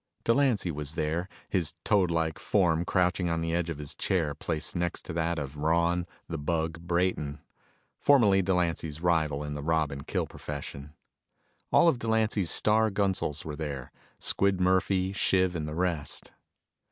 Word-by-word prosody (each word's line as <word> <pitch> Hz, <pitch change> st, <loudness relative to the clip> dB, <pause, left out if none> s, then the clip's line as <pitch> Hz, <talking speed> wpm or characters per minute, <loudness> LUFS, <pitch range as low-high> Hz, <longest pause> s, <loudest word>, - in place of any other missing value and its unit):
Delancy 115 Hz, -7 st, +2 dB
was 75 Hz, 0 st, -6 dB
there, 85 Hz, +5 st, -1 dB, 0.2 s
his 85 Hz, -4 st, -1 dB
toadlike 85 Hz, -6 st, +2 dB
form 85 Hz, -4 st, +2 dB
crouching 90 Hz, -1 st, +1 dB
on 80 Hz, 0 st, 0 dB
the 80 Hz, 0 st, -1 dB
edge 85 Hz, -1 st, 0 dB
of 80 Hz, -, -4 dB
his 75 Hz, -1 st, -5 dB
chair 80 Hz, -6 st, 0 dB
placed 75 Hz, +3 st, -3 dB
next 85 Hz, -1 st, -2 dB
to -, -, -5 dB
that 85 Hz, 0 st, 0 dB
of 70 Hz, -1 st, -5 dB
Ron 85 Hz, +3 st, +1 dB, 0.2 s
"The 80 Hz, -2 st, -4 dB
Bug" 80 Hz, +2 st, -2 dB
Brayton, 85 Hz, -4 st, 0 dB, 0.6 s
formerly 105 Hz, -9 st, +5 dB
Delancy's 85 Hz, -4 st, -1 dB
rival 80 Hz, -4 st, +1 dB
in 75 Hz, 0 st, -4 dB
the 75 Hz, -, -4 dB
rob 80 Hz, 0 st, +1 dB
and 70 Hz, 0 st, -7 dB
kill -, -, 0 dB
profession. 70 Hz, 0 st, -8 dB, 0.8 s
All -, -, +6 dB
of 135 Hz, -7 st, +3 dB
Delancy's 110 Hz, -5 st, +1 dB
star 110 Hz, +4 st, +3 dB
gunsels 95 Hz, -7 st, -1 dB
were 75 Hz, -2 st, -4 dB
there 70 Hz, -4 st, -5 dB, 0.3 s
Squid 100 Hz, -1 st, +1 dB
Murphy, 95 Hz, +1 st, +2 dB
Shiv 95 Hz, -2 st, +2 dB
and 80 Hz, -2 st, -3 dB
the 75 Hz, -, -5 dB
rest. 85 Hz, -5 st, -2 dB
85 Hz, 155 wpm, -29 LUFS, 75-95 Hz, 0.8 s, All